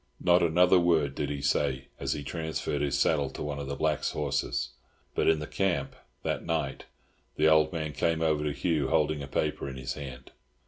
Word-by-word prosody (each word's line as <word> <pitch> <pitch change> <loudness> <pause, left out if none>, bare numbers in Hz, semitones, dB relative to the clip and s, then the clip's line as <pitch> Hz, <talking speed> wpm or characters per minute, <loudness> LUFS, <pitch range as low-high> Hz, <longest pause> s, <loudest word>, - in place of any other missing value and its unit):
Not 90 0 +4
another 90 +2 +5
word 80 -5 +2
did 70 0 -2
he 70 -1 -4
say, 65 -2 +1
as - - -1
he 75 - -5
transferred 80 -1 -3
his 70 -3 +1
saddle 70 -4 +2
to - - -6
one 75 -1 -3
of 70 - -5
the 70 - -3
blacks' - - 0
horses. 75 -3 -1 0.4
But - - +1
in 80 - +5
the 75 - -4
camp, 95 +2 -1 0.3
that - - -1
night, 80 -5 -2 0.5
the 75 - +3
old 80 +1 +5
man 80 -4 -3
came 80 +3 +1
over 80 -2 +2
to 75 - 0
Hugh 75 -1 0
holding 75 -1 +1
a 70 - -6
paper 70 0 -1
in 65 - -7
his 65 +2 -4
hand. 65 -4 -8
75 Hz, 200 wpm, -29 LUFS, 70-80 Hz, 0.5 s, another